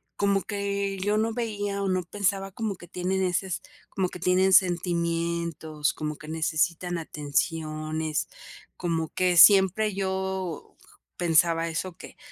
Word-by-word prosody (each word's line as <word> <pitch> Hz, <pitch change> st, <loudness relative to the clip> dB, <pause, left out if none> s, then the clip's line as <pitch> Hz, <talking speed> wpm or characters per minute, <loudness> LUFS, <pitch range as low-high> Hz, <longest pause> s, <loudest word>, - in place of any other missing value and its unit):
como 200 Hz, -1 st, +2 dB
que 200 Hz, -1 st, -2 dB
yo 205 Hz, +2 st, +1 dB
no 225 Hz, +1 st, +1 dB
veía 205 Hz, -4 st, -2 dB
o 195 Hz, -, 0 dB
no 185 Hz, 0 st, +1 dB
pensaba 195 Hz, +1 st, -1 dB
como 215 Hz, 0 st, -3 dB
que 175 Hz, -1 st, -13 dB
tienen 185 Hz, +2 st, -1 dB
ese 185 Hz, +1 st, 0 dB
s 180 Hz, -, -3 dB, 0.3 s
como 185 Hz, -2 st, -1 dB
que -, -, -8 dB
tienen 185 Hz, +2 st, +3 dB
sentimientos, 170 Hz, -3 st, +1 dB
como 150 Hz, 0 st, -4 dB
que 155 Hz, -, -12 dB
necesitan 165 Hz, +2 st, -1 dB
atenciones. 155 Hz, 0 st, -2 dB, 0.5 s
Como 165 Hz, -3 st, -1 dB
que 180 Hz, -1 st, +1 dB
siempre 195 Hz, +3 st, +7 dB
yo 190 Hz, -3 st, -3 dB, 0.4 s
pensaba 165 Hz, 0 st, +2 dB
eso, 170 Hz, +2 st, -4 dB
que, -, -, -12 dB
180 Hz, 135 wpm, -26 LUFS, 165-195 Hz, 0.5 s, siempre